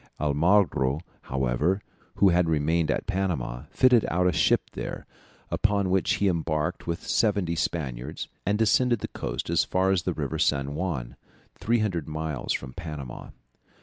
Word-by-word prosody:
Almagro, 75 -2 +2 0.3
however, 65 +8 +1 0.4
who 100 - +5
had 90 -1 +3
remained 80 +1 +1
at - - 0
Panama, 90 -12 -2
fitted 125 -3 +4
out 90 +1 +1
a 90 - +4
ship - - +2
there, - - -6 0.5
upon 100 -3 +1
which 95 +1 +2
he 100 -1 +1
embarked 80 -1 -1
with 85 0 -3
seventy 100 -6 +1
Spaniards, 75 -4 -3 0.2
and 100 +2 +1
descended 120 +1 +3
the - - -2
coast - - -4
as - - +3
far 95 +1 +1
as 95 -2 +2
the 90 0 -2
River 75 -4 -3
San 70 +1 +1
Juan, 70 -7 -3 0.4
300 105 -8 0
miles 80 -4 -3
from 65 -2 -3
Panama. 75 -8 -7
85 Hz, 150 wpm, -26 LUFS, 75-95 Hz, 0.5 s, who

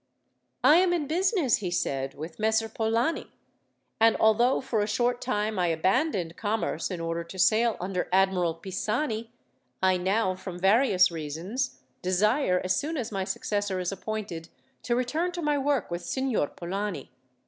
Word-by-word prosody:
"I 305 - +7
am 360 0 +3
in 330 -4 0
business," 345 - +2
he 190 -4 -3
said, 135 -5 -2
"with 160 +3 -8
Messer 220 +1 +2
Polani, 225 +7 -1 0.7
and 225 0 +5
although, 235 +4 +4
for 230 -5 -1
a 205 - 0
short 240 +3 0
time, 215 -4 -1
I 175 - +2
abandoned 175 - 0
commerce 215 +2 -2
in 180 -3 -4
order 165 0 -2
to 190 - -10
sail 220 +4 +3
under 180 0 -2
Admiral 185 -3 +2
Pisani, 220 - -3 0.5
I 185 -1 +3
now, 190 +2 +1
from 185 -1 -7
various 195 0 +4
reasons, 170 - -4 0.2
desire, 185 +2 +2
as 185 0 +1
soon 310 - -2
as 235 -5 -3
my 195 -2 -2
successor 205 -1 -2
is 180 0 -2
appointed, 195 -4 -5 0.3
to 240 - 0
return 305 +9 0
to 350 - -4
my 295 -1 +1
work 275 -7 0
with 175 +1 -3
Signor 260 - 0
Polani. 185 -2 -5
210 Hz, 160 wpm, -27 LUFS, 180-245 Hz, 0.7 s, I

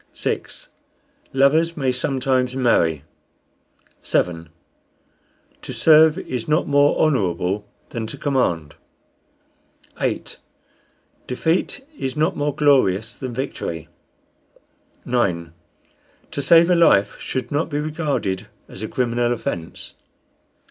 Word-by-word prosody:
6. - - -4 0.6
Lovers 155 +5 +3
may 135 -3 +1
sometimes 130 0 0
marry. 85 - +2 1.0
7. 85 -2 -1 1.1
To - - -6
serve 160 +1 +6
is 125 -10 -4
not 155 +2 +1
more 145 0 +3
honorable 100 - 0 0.2
than 115 -2 -4
to - - -8
command. 85 - 0 1.3
8. - - -3 0.9
Defeat 165 - -1
is 130 +1 -3
not 155 - +1
more 145 -1 -1
glorious 120 -7 +2
than 130 -3 -6
victory. 85 - -4 1.2
9. 85 -9 -1 0.8
To 140 - -3
save 170 +5 +6
a - - +5
life 105 -12 +4
should 130 +2 -4
not 145 +3 0
be 145 - -2
regarded 150 - -2 0.2
as 95 - -11
a 110 - -3
criminal 120 -1 0
offence. 85 -8 -5
130 Hz, 105 wpm, -21 LUFS, 100-150 Hz, 1.3 s, serve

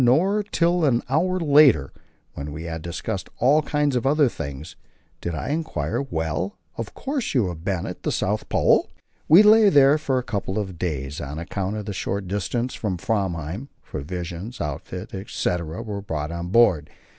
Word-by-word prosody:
Not 195 - +3
till 170 0 +2
an 125 -5 +3
hour 180 +6 +1
later, 140 - +5 0.4
when 70 +2 -6
we 80 +2 -6
had 80 -1 -5
discussed 90 +4 -4
all 140 +6 +4
kinds 145 -2 0
of 125 - 0
other 145 0 +4
things, 75 - -7 0.5
did 85 -1 -3
I 80 - -4
enquire 155 -1 -2
"Well, 85 - -3 0.2
of 115 -2 -6
course 270 - -3
you 110 -8 +3
have 80 -2 -7
been 95 -2 -1
at - - -6
the - - -1
South - - -1
Pole?" - - +3 0.4
We 170 +7 +8
lay 215 0 +7
there 145 -2 +6
for 135 -3 0
a 125 - -1
couple 100 -3 -3
of 95 -5 -4
days; 70 -5 -3
on 75 +2 -5
account 95 +4 -3
of 105 -1 -4
the 100 - -4
short 95 0 -3
distance 110 +6 -2
from 95 -5 -2
Framheim, 95 - -2 0.2
provisions, 90 - -6
outfit, 90 +7 -5
etc., 90 -4 -3
were 100 -2 -5
brought 75 -5 -4
on 85 0 -4
board. 90 -8 +4
100 Hz, 175 wpm, -24 LUFS, 85-140 Hz, 0.5 s, We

